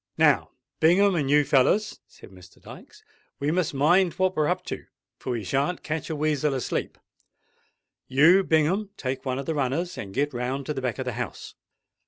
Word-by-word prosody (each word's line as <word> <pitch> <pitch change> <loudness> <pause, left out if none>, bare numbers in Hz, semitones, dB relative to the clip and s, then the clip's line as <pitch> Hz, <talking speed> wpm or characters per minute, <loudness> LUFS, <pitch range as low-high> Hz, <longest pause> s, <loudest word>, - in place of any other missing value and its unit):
"Now, 150 -3 +3 0.3
Bingham 190 +5 +4
and 150 -6 -1
you 150 +1 +5
fellers," 150 +10 +2
said - - -16
Mr. 90 -1 -17
Dykes, - - -14 0.4
"we 145 +2 0
must 175 -1 0
mind 170 +5 +3
what 185 0 0
we're 155 -1 +1
up - - -1
to; - - -6 0.3
for - - -7
we 115 -3 -3
shan't 140 - -1
catch 155 +1 -4
a 160 - -2
weasel 150 -1 0
asleep. 130 - -3 1.1
You, 160 +9 +5
Bingham, 180 +6 +1
take 130 +1 -4
one 130 -1 -1
of 135 - -4
the 160 - -1
runners 150 +6 -2
and 100 - -6
get 145 +6 -1
round 130 +3 -3
to 150 - -2
the 135 - -4
back 125 -4 -2
of - - -4
the - - -3
house. - - -7
150 Hz, 190 wpm, -25 LUFS, 135-170 Hz, 1.1 s, you